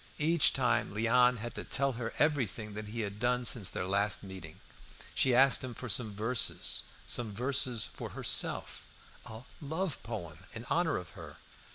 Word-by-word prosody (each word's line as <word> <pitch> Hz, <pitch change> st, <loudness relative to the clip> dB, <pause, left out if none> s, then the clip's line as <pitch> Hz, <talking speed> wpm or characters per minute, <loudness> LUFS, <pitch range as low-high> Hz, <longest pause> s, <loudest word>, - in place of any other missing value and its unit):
Each 160 Hz, +1 st, +3 dB
time 125 Hz, -5 st, 0 dB
Léon 125 Hz, +3 st, +4 dB
had 120 Hz, +2 st, -6 dB
to -, -, -6 dB
tell 140 Hz, 0 st, +1 dB
her 115 Hz, -2 st, -5 dB
everything 120 Hz, -8 st, 0 dB
that 105 Hz, +1 st, -6 dB
he 115 Hz, +2 st, -4 dB
had 100 Hz, -1 st, -5 dB
done 125 Hz, +1 st, +1 dB
since 115 Hz, -4 st, +1 dB
their 90 Hz, -, -4 dB
last 100 Hz, 0 st, +2 dB
meeting. 95 Hz, -5 st, -9 dB, 0.5 s
She 130 Hz, -2 st, +3 dB
asked 135 Hz, +1 st, +5 dB
him 125 Hz, -2 st, -6 dB
for 125 Hz, -, -6 dB
some 105 Hz, 0 st, 0 dB
verses 115 Hz, +3 st, +2 dB, 0.2 s
some 115 Hz, -3 st, +1 dB
verses 125 Hz, -2 st, +2 dB
"for -, -, -8 dB
herself," -, -, 0 dB, 0.4 s
a 110 Hz, +2 st, -9 dB, 0.2 s
"love 160 Hz, +3 st, -3 dB
poem" 85 Hz, -9 st, -7 dB, 0.2 s
in 115 Hz, +1 st, -7 dB
honour 165 Hz, -2 st, +1 dB
of 90 Hz, -3 st, -8 dB
her. -, -, -11 dB
115 Hz, 170 wpm, -31 LUFS, 105-130 Hz, 0.5 s, asked